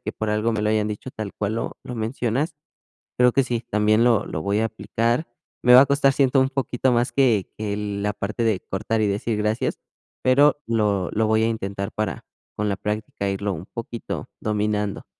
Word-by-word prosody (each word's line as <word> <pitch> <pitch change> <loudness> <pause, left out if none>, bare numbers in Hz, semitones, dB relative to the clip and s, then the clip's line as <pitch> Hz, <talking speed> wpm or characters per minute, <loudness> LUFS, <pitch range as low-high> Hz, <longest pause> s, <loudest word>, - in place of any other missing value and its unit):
que - - -5
por 110 -1 -3
algo 105 +2 +1
me 105 -1 -1
lo 105 - +2
hayan 105 -1 +1
dicho, 105 +5 -6
tal 110 -4 -6
cual 105 +2 -2
lo - - -4
lo 125 - -6
mencionas. 120 +6 -1 0.6
Pero 125 0 +5
que 135 - +3
sí, 120 -2 -2
también 105 +2 +3
lo 115 -4 +3
lo 80 - -4
voy 100 +3 0
a 110 - +2
aplicar. 115 +5 -1 0.4
Me 125 0 +7
va 130 - +10
a - - +6
costar, 140 -1 +3
siento, 135 -1 +3
un 130 - +2
poquito 130 -1 0
más, 120 +2 +1
que 120 -8 +3
que 105 -1 -2
la 105 0 -2
parte 105 +4 -3
de 110 -5 +2
cortar 110 +3 -2
y 105 - +2
decir: 105 +2 -1
"Gracias", 105 +2 -1 0.4
pero 145 +3 +4
lo 105 -5 +1
lo 110 +1 +1
voy 110 0 +3
a - - +3
intentar, 100 -3 -3
para 110 0 -3 0.3
con 105 0 0
la 100 - -1
práctica, 105 -1 -3
irlo 100 +1 -2
un 85 +2 -7
poquito 115 0 -6
dominando. 105 -1 -1
110 Hz, 205 wpm, -23 LUFS, 105-120 Hz, 0.6 s, va